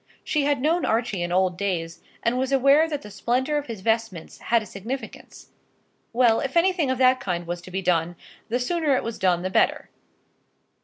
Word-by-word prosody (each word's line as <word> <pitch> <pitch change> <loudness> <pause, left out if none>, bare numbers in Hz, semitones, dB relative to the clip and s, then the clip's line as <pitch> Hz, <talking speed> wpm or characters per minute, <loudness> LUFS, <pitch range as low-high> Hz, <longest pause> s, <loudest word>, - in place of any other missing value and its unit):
She 295 -2 0
had 285 -3 +1
known 330 +3 +2
Archie 225 -4 0
in 175 0 -2
old 180 -1 +1
days, 170 -4 -3 0.2
and 240 +2 +1
was 260 +1 -1
aware 275 +4 +4
that 295 -3 -4
the 210 - -10
splendour 255 +8 0
of 290 - -9
his 225 -4 -7
vestments 225 -5 -2
had 230 -1 +1
a - - -10
significance. 230 +8 -8 0.6
Well, 235 -2 +3
if 270 +4 -2
anything 340 -4 +2
of 260 - 0
that 255 0 +4
kind 175 -2 -3
was 175 0 -5
to 180 - -12
be 190 +1 -4
done, 175 -1 +1 0.3
the 245 +2 0
sooner 310 +1 +1
it - - -1
was 230 -1 -5
done 180 -2 +1
the 185 - -3
better. - - +1
230 Hz, 200 wpm, -24 LUFS, 185-275 Hz, 0.6 s, aware